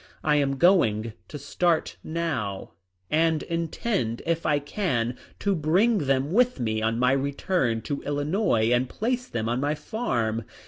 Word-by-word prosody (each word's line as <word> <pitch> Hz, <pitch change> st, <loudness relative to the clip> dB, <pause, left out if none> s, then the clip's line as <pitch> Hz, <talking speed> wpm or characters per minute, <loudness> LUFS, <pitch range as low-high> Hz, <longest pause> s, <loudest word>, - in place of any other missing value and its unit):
I 150 Hz, -1 st, +3 dB
am 135 Hz, -1 st, +1 dB
going 115 Hz, -, +3 dB
to -, -, -7 dB
start 160 Hz, +4 st, 0 dB
now 135 Hz, -, -3 dB, 0.4 s
and 160 Hz, 0 st, +2 dB
intend, 165 Hz, -, -2 dB
if 165 Hz, 0 st, 0 dB
I 150 Hz, -1 st, +3 dB
can, 140 Hz, -, -1 dB, 0.2 s
to 200 Hz, -, 0 dB
bring 180 Hz, -, +2 dB
them 135 Hz, +2 st, +1 dB
with 250 Hz, +5 st, +3 dB
me 110 Hz, -2 st, -1 dB
on 110 Hz, +1 st, 0 dB
my 125 Hz, +1 st, +3 dB
return 135 Hz, -3 st, 0 dB
to 145 Hz, -, -3 dB
Illinois 145 Hz, -, +1 dB
and 125 Hz, +1 st, +2 dB
place 250 Hz, +3 st, -2 dB
them 110 Hz, -1 st, -3 dB
on 120 Hz, +2 st, 0 dB
my 145 Hz, +2 st, 0 dB
farm." 115 Hz, -, -2 dB
145 Hz, 150 wpm, -26 LUFS, 120-170 Hz, 0.4 s, I